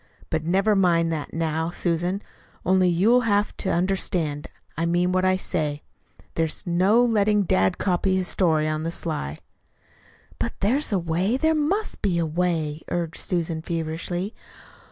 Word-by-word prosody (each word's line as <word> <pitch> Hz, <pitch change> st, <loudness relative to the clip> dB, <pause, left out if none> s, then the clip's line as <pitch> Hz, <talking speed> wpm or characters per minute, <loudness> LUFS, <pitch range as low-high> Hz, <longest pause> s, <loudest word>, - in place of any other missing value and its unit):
But 160 Hz, -1 st, 0 dB
never 195 Hz, +6 st, +2 dB
mind 170 Hz, -3 st, +3 dB
that 155 Hz, -2 st, -4 dB
now, 160 Hz, 0 st, -1 dB
Susan; 175 Hz, +3 st, -1 dB, 0.4 s
only 185 Hz, -1 st, +4 dB
you'll 180 Hz, +6 st, +3 dB
you'll -, -, +3 dB
have 210 Hz, -3 st, +1 dB
to 190 Hz, -, -2 dB
understand 170 Hz, -5 st, -1 dB, 0.3 s
I 165 Hz, +2 st, -1 dB
mean 175 Hz, +1 st, +2 dB
what 185 Hz, 0 st, +1 dB
I 185 Hz, 0 st, +4 dB
say. 155 Hz, -6 st, -2 dB, 0.5 s
There's 160 Hz, -1 st, -2 dB
no 190 Hz, +7 st, +4 dB
letting 210 Hz, -2 st, +3 dB
dad 95 Hz, -, +2 dB
copy 185 Hz, 0 st, +1 dB
that 185 Hz, -, +1 dB
story 160 Hz, -4 st, +2 dB
on 155 Hz, 0 st, -1 dB
the 165 Hz, -, -2 dB
sly." 150 Hz, -, -4 dB, 1.0 s
"But -, -, -2 dB
there's 255 Hz, +9 st, +1 dB
a 200 Hz, -, +2 dB
way, 180 Hz, +7 st, 0 dB
there 315 Hz, +3 st, +2 dB
must 330 Hz, +8 st, -1 dB
be 185 Hz, -4 st, +1 dB
a 170 Hz, -, +1 dB
way," 160 Hz, -2 st, -1 dB
argued 170 Hz, -2 st, -3 dB
Susan 165 Hz, -3 st, -1 dB
feverishly. 170 Hz, +4 st, -3 dB
175 Hz, 155 wpm, -24 LUFS, 160-195 Hz, 1.0 s, only